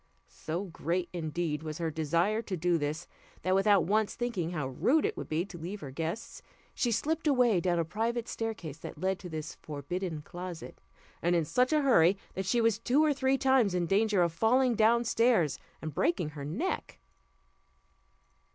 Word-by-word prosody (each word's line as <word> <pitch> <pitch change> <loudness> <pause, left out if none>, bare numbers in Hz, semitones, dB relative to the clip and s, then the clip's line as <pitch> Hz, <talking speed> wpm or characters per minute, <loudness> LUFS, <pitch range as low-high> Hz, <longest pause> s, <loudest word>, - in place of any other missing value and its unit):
So 165 - -4
great, 175 0 -2
indeed, 160 -2 -2
was 155 -1 -5
her 165 -2 -2
desire 170 +8 +1
to 195 -5 -4
do 170 0 +1
this, 155 +3 -3 0.4
that, 185 - +2
without 195 -1 +4
once 215 +3 +1
thinking 230 -9 -2
how 150 -6 -3
rude 270 - +2
it 425 - -1
would - - -7
be 160 +3 0
to 185 -3 -10
leave 185 +6 -6
her 140 - -7
guests, 165 +9 -5 0.3
she 240 - 0
slipped 315 +8 0
away 250 -8 +4
down 175 0 +1
a 165 - +1
private 230 +6 -2
staircase 195 -10 -5
that - - -8
led 190 +3 -1
to 180 - -8
this 155 0 -5
forbidden 155 +2 -5
closet, 175 0 -8 0.4
and 175 +1 +2
in 165 -2 +2
such 250 - +2
a 305 -1 +3
hurry, 195 -8 +5 0.2
that 190 0 -4
she 235 +5 +2
was 225 -2 +2
two 260 +6 +3
or 300 - +3
three 265 0 +1
times 260 -8 +3
in 175 -1 +1
danger 200 0 +3
of 170 -2 0
falling 245 +6 +3
down 230 +2 +4
stairs 230 - +2 0.2
and 155 -1 -4
breaking 170 0 +1
her 145 -2 -7
neck. 150 - -3
185 Hz, 185 wpm, -30 LUFS, 165-230 Hz, 0.4 s, hurry